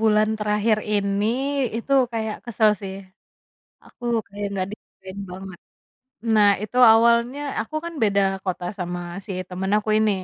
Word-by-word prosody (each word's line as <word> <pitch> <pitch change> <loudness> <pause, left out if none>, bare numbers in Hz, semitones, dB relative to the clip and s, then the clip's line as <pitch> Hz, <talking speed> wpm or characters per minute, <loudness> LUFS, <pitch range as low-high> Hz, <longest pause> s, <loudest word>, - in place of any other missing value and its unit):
bulan 215 -1 +3
terakhir 210 +1 +1
ini. 200 0 +1 0.5
Itu 255 +4 -4 0.2
kayak 220 -1 -2
kesel, 220 -2 +3
sih. 190 -1 -6 0.9
Aku - - -15 0.2
kayak 205 0 -5
nggak 190 -2 -1
dihargain 190 -2 -12
banget. 190 -1 -9 0.8
Nah, 210 -1 +6
itu 215 +4 -6 0.2
awalnya 235 +4 +3 0.2
aku 225 +8 -6
kan 340 - -5
beda 200 -2 +3 0.2
kota 185 -2 -3
sama 175 0 -3 0.3
si - - -9 0.2
temen 190 +1 -3
aku 215 0 -2
ini. 215 -1 +3
210 Hz, 140 wpm, -23 LUFS, 195-225 Hz, 0.9 s, Nah